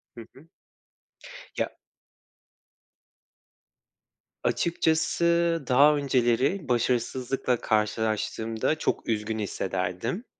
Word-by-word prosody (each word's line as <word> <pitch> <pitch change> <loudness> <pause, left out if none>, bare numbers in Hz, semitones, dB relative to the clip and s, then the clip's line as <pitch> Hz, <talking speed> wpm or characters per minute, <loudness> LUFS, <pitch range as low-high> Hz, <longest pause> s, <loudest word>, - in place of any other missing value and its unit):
Hı 115 - -9
hı. 145 +5 -17 1.1
Ya - - 0 2.7
Açıkçası 170 0 +1
daha 145 +4 +6
önceleri 135 +4 +1
başarısızlıkla 125 +1 0
karşılaştığımda 110 +3 0
çok - - -2
üzgün 110 0 -1
hissederdim. 95 - -3
125 Hz, 65 wpm, -26 LUFS, 110-150 Hz, 2.7 s, daha